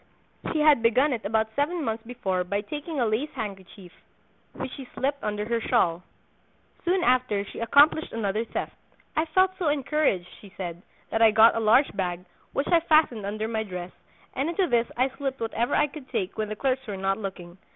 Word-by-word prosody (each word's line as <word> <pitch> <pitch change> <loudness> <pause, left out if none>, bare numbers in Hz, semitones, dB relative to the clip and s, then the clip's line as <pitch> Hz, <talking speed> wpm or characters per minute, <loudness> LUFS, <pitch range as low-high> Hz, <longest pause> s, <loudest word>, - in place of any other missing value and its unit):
She 310 - 0
had 300 -5 +5
begun 255 +5 +3
it 230 -4 -5
about 220 +1 0
seven 310 +4 0
months 225 -2 -3
before 195 -7 -2
by 200 +3 -2
taking 295 +6 -5
a 240 - +2
lace 225 +7 0
handkerchief, 195 -5 -7 0.6
which - - -6
she 270 -2 -9
slipped 280 +1 -1
under 210 0 -2
her 235 0 0
shawl: 180 -9 +1 0.8
Soon 360 +1 +1
after 250 -5 +2
she - - -9
accomplished 285 +7 +4
another 215 -1 -1
theft. - - -4 0.4
"I 310 - +2
felt 370 +4 +3
so 350 - 0
encouraged," 290 - +1
she 200 - -14
said, 175 -2 -5 0.3
"that 225 - 0
I 225 - +8
got 220 +1 +6
a - - 0
large 225 +5 +4
bag, 180 -2 -2 0.3
which 275 - -1
I 340 - +6
fastened 310 -10 +2
under 215 +2 -3
my 220 -1 -1
dress, 180 -4 -6 0.4
and 275 +5 -1
into 370 +3 +1
this 240 -5 +2
I 255 +2 +2
slipped 270 -1 -3
whatever 230 +1 -1
I 295 - +4
could 290 -2 -10
take 190 +1 -2
when 215 -1 -2
the 215 - -4
clerks 265 +2 -1
were 200 -2 -4
not 195 +2 0
looking. 185 -3 -7
230 Hz, 195 wpm, -26 LUFS, 205-285 Hz, 0.8 s, I